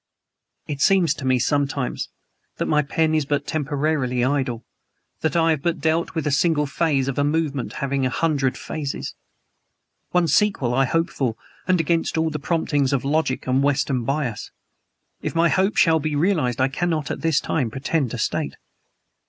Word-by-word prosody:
It 145 Hz, -2 st, -4 dB
seems 180 Hz, -5 st, +4 dB
to 130 Hz, -, -7 dB
me 130 Hz, -1 st, +3 dB
sometimes 140 Hz, 0 st, -1 dB, 0.5 s
that -, -, -1 dB
my 150 Hz, -1 st, +3 dB
pen 155 Hz, +2 st, 0 dB
is 155 Hz, -1 st, +2 dB
but 145 Hz, 0 st, -1 dB
temporarily 145 Hz, -4 st, 0 dB
idle 130 Hz, -4 st, -1 dB, 0.5 s
that 160 Hz, +1 st, -1 dB
I 165 Hz, -1 st, +4 dB
have 155 Hz, -3 st, 0 dB
but 170 Hz, +2 st, -1 dB
dealt 160 Hz, +1 st, 0 dB
with 160 Hz, -, -1 dB
a 150 Hz, -, +1 dB
single 150 Hz, +1 st, +2 dB
phase 140 Hz, -2 st, 0 dB
of 135 Hz, 0 st, -2 dB
a -, -, +3 dB
movement 145 Hz, -3 st, -1 dB
having 135 Hz, 0 st, -1 dB
a 130 Hz, -, +2 dB
hundred 140 Hz, +1 st, 0 dB
phases. 145 Hz, -3 st, -5 dB, 1.0 s
One 180 Hz, -1 st, +2 dB
sequel 150 Hz, -, +2 dB
I 135 Hz, +2 st, +3 dB
hope 165 Hz, +6 st, 0 dB
for, 125 Hz, -5 st, -1 dB, 0.3 s
and 185 Hz, -1 st, +3 dB
against 165 Hz, +1 st, 0 dB
all 160 Hz, 0 st, +1 dB
the 150 Hz, -, -3 dB
promptings 145 Hz, -3 st, 0 dB
of 135 Hz, -1 st, 0 dB
logic 145 Hz, -2 st, 0 dB
and 130 Hz, +1 st, +2 dB
Western 140 Hz, -3 st, +1 dB
bias. 135 Hz, -3 st, -2 dB, 0.7 s
If -, -, -4 dB
my 165 Hz, +1 st, +4 dB
hope 190 Hz, +4 st, +2 dB
shall 160 Hz, -3 st, +5 dB
be 155 Hz, 0 st, -2 dB
realized 145 Hz, -7 st, +1 dB
I 130 Hz, -, +4 dB
cannot, 155 Hz, +1 st, -1 dB
at -, -, -4 dB
this 160 Hz, -4 st, +2 dB
time, 130 Hz, -8 st, -1 dB
pretend 135 Hz, +3 st, -1 dB
to -, -, -5 dB
state. -, -, -2 dB
145 Hz, 175 wpm, -22 LUFS, 135-160 Hz, 1.0 s, shall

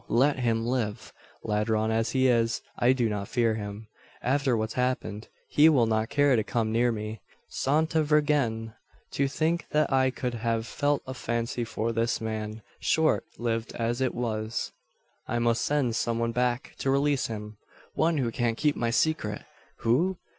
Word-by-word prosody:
let 135 Hz, +4 st, +3 dB
him 115 Hz, -2 st, +1 dB
live. 115 Hz, -3 st, -2 dB, 0.3 s
Ladron 110 Hz, +1 st, +1 dB
as 115 Hz, 0 st, 0 dB
he 130 Hz, 0 st, +3 dB
is, 115 Hz, -2 st, +2 dB
I 120 Hz, -, +3 dB
do 125 Hz, -3 st, +2 dB
not 105 Hz, -2 st, -3 dB
fear 115 Hz, -3 st, +1 dB
him. 105 Hz, 0 st, -6 dB, 0.4 s
After 130 Hz, -1 st, +2 dB
what's 110 Hz, 0 st, -2 dB
happened 125 Hz, -4 st, -2 dB, 0.2 s
he 155 Hz, +2 st, +6 dB
will 130 Hz, -7 st, +4 dB
not 110 Hz, 0 st, 0 dB
care 145 Hz, -2 st, +4 dB
to 110 Hz, -, +2 dB
come 110 Hz, 0 st, -1 dB
near 120 Hz, +2 st, +3 dB
me. 110 Hz, -1 st, -5 dB, 0.3 s
Santa 160 Hz, +3 st, +1 dB
Virgen! 145 Hz, -7 st, +1 dB, 0.4 s
to 140 Hz, -, +1 dB
think 160 Hz, +5 st, -1 dB
that 150 Hz, -2 st, +1 dB
I 130 Hz, 0 st, +4 dB
could 125 Hz, -1 st, -3 dB
have 115 Hz, -1 st, -1 dB
felt 145 Hz, +4 st, 0 dB
a 130 Hz, -, -5 dB
fancy 120 Hz, -1 st, -2 dB
for 115 Hz, 0 st, -2 dB
this 115 Hz, 0 st, 0 dB
man 110 Hz, -1 st, -4 dB, 0.2 s
short 160 Hz, -1 st, +2 dB
lived 115 Hz, -1 st, -2 dB
as 120 Hz, +2 st, -1 dB
it 130 Hz, -, 0 dB
was! 110 Hz, -1 st, -2 dB, 0.6 s
"I 120 Hz, -, -1 dB
must 120 Hz, 0 st, +1 dB
send 140 Hz, -6 st, +1 dB
some 115 Hz, 0 st, 0 dB
one 115 Hz, 0 st, 0 dB
back 125 Hz, +1 st, -1 dB
to 135 Hz, -, -1 dB
release 140 Hz, 0 st, +2 dB
him. 105 Hz, -1 st, -7 dB, 0.4 s
One 165 Hz, 0 st, +2 dB
who 125 Hz, -4 st, 0 dB
can 115 Hz, -1 st, 0 dB
keep 150 Hz, +3 st, +1 dB
my 115 Hz, -, 0 dB
secret 120 Hz, -4 st, 0 dB, 0.4 s
who? 170 Hz, +11 st, +2 dB
120 Hz, 170 wpm, -27 LUFS, 110-135 Hz, 0.6 s, he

